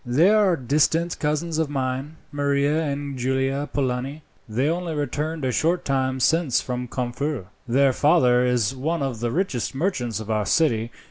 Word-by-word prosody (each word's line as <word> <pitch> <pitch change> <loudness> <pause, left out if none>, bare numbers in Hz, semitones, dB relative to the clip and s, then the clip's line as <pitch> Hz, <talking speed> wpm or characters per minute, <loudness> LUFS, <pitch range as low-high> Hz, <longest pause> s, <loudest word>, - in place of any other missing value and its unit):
"They 145 +10 +4
are 205 -4 +4
distant 155 +6 +1
cousins 155 +2 -1
of 160 -3 0
mine, 135 +2 -3 0.2
Maria 145 +1 +1
and 140 -2 -3
Giulia 135 +3 0
Polani. 135 +2 -2 0.3
They 125 +6 0
only 170 0 -2
returned 150 +1 -2
a 130 - +1
short 165 +7 +1
time 130 -1 0
since 155 0 +2
from 125 0 -4
Corfu. 125 0 -3 0.2
Their 135 +2 +3
father 125 -5 +4
is 125 0 +1
one 155 +4 -1
of 130 -5 -3
the 120 0 -1
richest 140 - -2
merchants 130 - -1
of 110 0 -5
our 105 -2 0
city. 115 -5 +2
140 Hz, 160 wpm, -23 LUFS, 125-155 Hz, 0.3 s, They